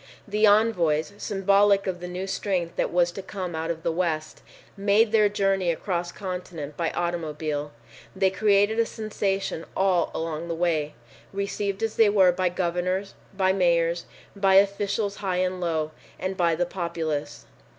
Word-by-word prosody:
The 210 Hz, +1 st, +3 dB
envoys, 200 Hz, -6 st, +3 dB
symbolic 200 Hz, 0 st, +3 dB
of 185 Hz, -2 st, -3 dB
the 180 Hz, -, -6 dB
new 180 Hz, +2 st, -4 dB
strength 185 Hz, -3 st, -2 dB
that -, -, 0 dB
was 175 Hz, 0 st, +2 dB
to 195 Hz, -, -7 dB
come 185 Hz, -2 st, -5 dB
out 160 Hz, +1 st, -3 dB
of 165 Hz, -1 st, -3 dB
the 170 Hz, -, +1 dB
West, 160 Hz, -3 st, -2 dB, 0.3 s
made 205 Hz, +2 st, +3 dB
their 215 Hz, -2 st, +4 dB
journey 195 Hz, -3 st, +1 dB
across 175 Hz, +1 st, -2 dB
continent 180 Hz, -6 st, -6 dB
by 165 Hz, -2 st, -1 dB
automobile. 155 Hz, -4 st, -3 dB, 0.4 s
They 190 Hz, 0 st, +2 dB
created 205 Hz, +2 st, +3 dB
a 230 Hz, -, +4 dB
sensation 195 Hz, -5 st, -2 dB
all 190 Hz, -3 st, +2 dB
along 160 Hz, 0 st, -3 dB
the 170 Hz, -, -2 dB
way, 160 Hz, -3 st, 0 dB, 0.4 s
received 200 Hz, +1 st, -3 dB
as 225 Hz, -, -2 dB
they 225 Hz, -2 st, +6 dB
were 190 Hz, -3 st, +5 dB
by 180 Hz, 0 st, 0 dB
governors, 180 Hz, +2 st, -2 dB, 0.2 s
by 190 Hz, -1 st, +3 dB
mayors, 170 Hz, -2 st, +2 dB, 0.3 s
by 195 Hz, -1 st, +3 dB
officials 200 Hz, +1 st, +2 dB
high 190 Hz, -3 st, -2 dB
and 185 Hz, 0 st, -1 dB
low, 160 Hz, -3 st, -1 dB, 0.3 s
and 185 Hz, +1 st, -3 dB
by 170 Hz, -3 st, +2 dB
the 175 Hz, +2 st, 0 dB
populace. 160 Hz, -5 st, -4 dB
185 Hz, 160 wpm, -25 LUFS, 170-200 Hz, 0.4 s, they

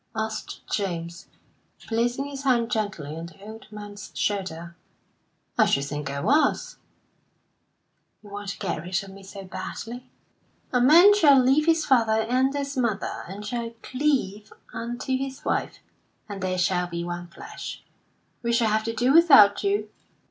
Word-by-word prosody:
asked 220 Hz, 0 st, -4 dB
James, 170 Hz, -3 st, -3 dB, 0.6 s
placing 240 Hz, +4 st, 0 dB
his 280 Hz, -1 st, -6 dB
hand 240 Hz, -4 st, +2 dB
gently 190 Hz, -, -2 dB
on 165 Hz, +1 st, -6 dB
the 170 Hz, -, -17 dB
old 220 Hz, +1 st, -11 dB
man's 205 Hz, -1 st, -9 dB
shoulder. 170 Hz, -4 st, -3 dB, 0.8 s
"I -, -, +6 dB
should 140 Hz, -, +2 dB
think 145 Hz, 0 st, -4 dB
I 140 Hz, 0 st, -3 dB
was." 290 Hz, -, +1 dB, 1.5 s
"You 205 Hz, -, -14 dB
want 205 Hz, 0 st, -6 dB
to -, -, -5 dB
get 175 Hz, -5 st, -3 dB
rid 180 Hz, +3 st, -2 dB
of 195 Hz, -, -11 dB
me 195 Hz, +1 st, -12 dB
so 195 Hz, 0 st, -10 dB
badly?" 225 Hz, +6 st, -7 dB, 0.6 s
"'A 250 Hz, -, +3 dB
man 340 Hz, +10 st, +8 dB
shall 300 Hz, -9 st, +6 dB
leave 270 Hz, +5 st, +3 dB
his 325 Hz, -1 st, +3 dB
father 225 Hz, -5 st, +3 dB
and 255 Hz, +4 st, +1 dB
his 280 Hz, 0 st, -3 dB
mother, 235 Hz, -6 st, -2 dB
and 200 Hz, +3 st, -8 dB
shall 235 Hz, +1 st, -4 dB
cleave 255 Hz, -7 st, -1 dB, 0.2 s
unto 240 Hz, +3 st, -3 dB
his 265 Hz, 0 st, -5 dB
wife; -, -, -1 dB, 0.5 s
and 200 Hz, -2 st, -7 dB
they 185 Hz, 0 st, -1 dB
shall 180 Hz, 0 st, +1 dB
be 170 Hz, -1 st, -4 dB
one 175 Hz, 0 st, -5 dB
flesh.' 170 Hz, -, -9 dB, 0.6 s
We 235 Hz, -1 st, -1 dB
shall 235 Hz, -2 st, +3 dB
have 215 Hz, 0 st, +1 dB
to 230 Hz, 0 st, -3 dB
do 250 Hz, +3 st, +2 dB
without 275 Hz, -12 st, +7 dB
you." 400 Hz, +1 st, 0 dB
220 Hz, 155 wpm, -25 LUFS, 190-260 Hz, 1.5 s, man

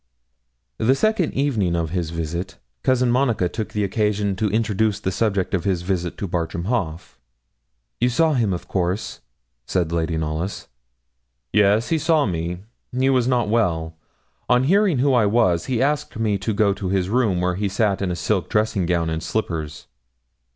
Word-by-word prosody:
The 125 Hz, +5 st, +3 dB
second 215 Hz, 0 st, +1 dB
evening 115 Hz, -11 st, +1 dB
of 80 Hz, -2 st, -2 dB
his 85 Hz, -3 st, -2 dB
visit, 85 Hz, +2 st, -4 dB, 0.2 s
Cousin 125 Hz, -2 st, +2 dB
Monica 120 Hz, -7 st, +2 dB
took 110 Hz, +4 st, -5 dB
occasion 105 Hz, 0 st, 0 dB
to 105 Hz, +1 st, 0 dB
introduce 110 Hz, -1 st, 0 dB
the 95 Hz, -, -2 dB
subject 100 Hz, -1 st, 0 dB
of 95 Hz, -, 0 dB
his 95 Hz, -3 st, 0 dB
visit 90 Hz, -2 st, -2 dB
to 100 Hz, -, -3 dB
Bartram 85 Hz, -1 st, -2 dB
Haugh. 95 Hz, -8 st, -3 dB, 0.8 s
'You 125 Hz, -, +3 dB
saw 160 Hz, +5 st, +2 dB
him, 115 Hz, -7 st, +1 dB
of 90 Hz, -, -4 dB
course?' 95 Hz, +2 st, -2 dB, 0.5 s
said 85 Hz, -3 st, 0 dB
Lady 80 Hz, -1 st, -1 dB
Knollys. 80 Hz, +5 st, -3 dB, 0.9 s
'Yes, 105 Hz, +2 st, +3 dB
he 165 Hz, -, +2 dB
saw 155 Hz, -1 st, +3 dB
me; 85 Hz, 0 st, -3 dB, 0.3 s
he 130 Hz, +2 st, +2 dB
was 125 Hz, -2 st, +2 dB
not 125 Hz, -3 st, +2 dB
well. 85 Hz, -8 st, 0 dB, 0.5 s
On 125 Hz, +1 st, +4 dB
hearing 190 Hz, +1 st, +3 dB
who 135 Hz, +2 st, +3 dB
I 115 Hz, -4 st, +4 dB
was, 100 Hz, -6 st, +2 dB
he 130 Hz, -1 st, +1 dB
asked 145 Hz, -4 st, -1 dB
me 110 Hz, -2 st, +1 dB
to 105 Hz, +4 st, -2 dB
go 100 Hz, -1 st, +2 dB
to 95 Hz, -2 st, -4 dB
his 95 Hz, -1 st, +1 dB
room, 110 Hz, -4 st, +1 dB
where 90 Hz, 0 st, +1 dB
he 100 Hz, +2 st, -1 dB
sat 100 Hz, 0 st, 0 dB
in 95 Hz, -, 0 dB
a 90 Hz, -, -1 dB
silk 90 Hz, +4 st, -1 dB
dressing 105 Hz, -4 st, +1 dB
gown 85 Hz, -2 st, +1 dB
and 80 Hz, 0 st, -2 dB
slippers.' 80 Hz, -6 st, -3 dB
100 Hz, 170 wpm, -22 LUFS, 90-120 Hz, 0.9 s, On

